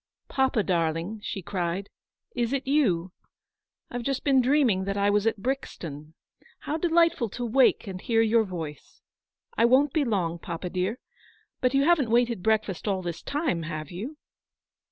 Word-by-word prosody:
" -, -, -67 dB
Papa, 265 Hz, -5 st, +1 dB
darling," 170 Hz, +3 st, -1 dB
she 195 Hz, -2 st, -5 dB
cried, 180 Hz, +1 st, -2 dB, 0.3 s
" -, -, -44 dB
is 235 Hz, +3 st, -1 dB
it 275 Hz, -1 st, -1 dB
you? 200 Hz, -, +2 dB, 0.8 s
I've 245 Hz, -, -3 dB
just 270 Hz, +2 st, -2 dB
been 270 Hz, -2 st, +4 dB
dreaming 245 Hz, -8 st, +2 dB
that 195 Hz, 0 st, -2 dB
I 200 Hz, 0 st, +3 dB
was 210 Hz, +1 st, +2 dB
at 225 Hz, -, +1 dB
Brixton. 160 Hz, -, -4 dB, 0.5 s
How 300 Hz, -, -3 dB
delightful 330 Hz, -7 st, +2 dB
to 245 Hz, +4 st, -4 dB
wake 250 Hz, +2 st, +3 dB
and 185 Hz, -2 st, -6 dB
hear 225 Hz, -1 st, +2 dB
your 225 Hz, 0 st, +3 dB
voice. 165 Hz, -7 st, -8 dB, 0.6 s
I -, -, +6 dB
won't 260 Hz, +3 st, +4 dB
be 310 Hz, -, +2 dB
long, 180 Hz, -9 st, -1 dB
papa 170 Hz, +2 st, -5 dB
dear. 185 Hz, +5 st, -1 dB, 0.6 s
But 255 Hz, +1 st, +1 dB
you 275 Hz, -, +4 dB
haven't 300 Hz, -6 st, +3 dB
waited 235 Hz, -3 st, +2 dB
breakfast 215 Hz, -2 st, 0 dB
all 190 Hz, -2 st, 0 dB
this 170 Hz, -1 st, -4 dB
time, 285 Hz, -, -1 dB
have 155 Hz, -2 st, -5 dB
vou 220 Hz, -, -6 dB
220 Hz, 170 wpm, -27 LUFS, 180-265 Hz, 0.8 s, I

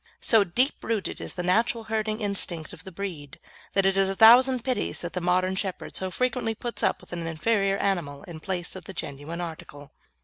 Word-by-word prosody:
So 220 Hz, -3 st, +4 dB
deep 245 Hz, -, 0 dB
rooted 220 Hz, -3 st, -2 dB
is -, -, -3 dB
the 180 Hz, -, -4 dB
natural 225 Hz, +6 st, +2 dB
herding 220 Hz, 0 st, -2 dB
instinct 190 Hz, -6 st, -2 dB
of -, -, -13 dB
the 190 Hz, -, -8 dB
breed 170 Hz, -7 st, -6 dB, 0.4 s
that 195 Hz, -1 st, +3 dB
it 195 Hz, 0 st, +3 dB
is 195 Hz, 0 st, +4 dB
a 195 Hz, -, -2 dB
thousand 245 Hz, +3 st, +7 dB
pities 255 Hz, -1 st, -1 dB
that 175 Hz, -, -5 dB
the 180 Hz, -, -2 dB
modern 185 Hz, +2 st, +1 dB
shepherd 190 Hz, -1 st, -4 dB
so 190 Hz, -, -2 dB
frequently 250 Hz, +1 st, -1 dB
puts 240 Hz, +2 st, -4 dB
up -, -, +1 dB
with -, -, -12 dB
an 170 Hz, -1 st, -4 dB
inferior 195 Hz, +4 st, +1 dB
animal 170 Hz, -9 st, -1 dB
in 165 Hz, -3 st, -9 dB
place 180 Hz, 0 st, -4 dB
of 190 Hz, -, -9 dB
the 195 Hz, -, -8 dB
genuine 145 Hz, +5 st, -5 dB
article. 150 Hz, -4 st, -8 dB
190 Hz, 205 wpm, -26 LUFS, 175-220 Hz, 0.4 s, thousand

